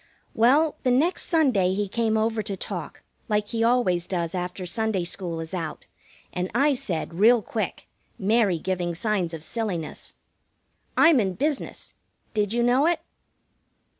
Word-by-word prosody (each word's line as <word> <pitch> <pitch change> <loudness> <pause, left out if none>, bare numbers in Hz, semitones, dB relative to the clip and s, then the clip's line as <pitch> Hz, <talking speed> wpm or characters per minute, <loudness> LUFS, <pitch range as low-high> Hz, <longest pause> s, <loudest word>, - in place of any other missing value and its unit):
Well, 280 +7 +4
the 255 - +1
next 295 +9 +1
Sunday 245 - +3
he 205 0 -1
came 220 +2 0
over 220 0 +1
to 200 -2 -4
talk, - - -6 0.3
like 210 -1 0
he 230 -1 0
always 230 -8 +2
does 170 -3 -2
after 180 0 -4
Sunday 220 -1 -1
school 170 -1 -4
is 160 +2 -7
out, 165 -4 -4 0.5
and 180 +1 -2
I 285 +3 +4
said, 175 -10 -3
real 230 +1 +6
quick, 215 -2 -4 0.3
Mary 205 -2 +2
giving 175 0 -2
signs 195 -3 -1
of 160 -2 -6
silliness: 185 -5 -4 0.8
"I'm 325 -5 +6
in 190 -4 0
business. 290 - -3 0.4
Did 210 -2 0
you 240 +1 +1
know 255 +5 +4
it?" 340 -2 +1
210 Hz, 150 wpm, -25 LUFS, 180-240 Hz, 0.8 s, real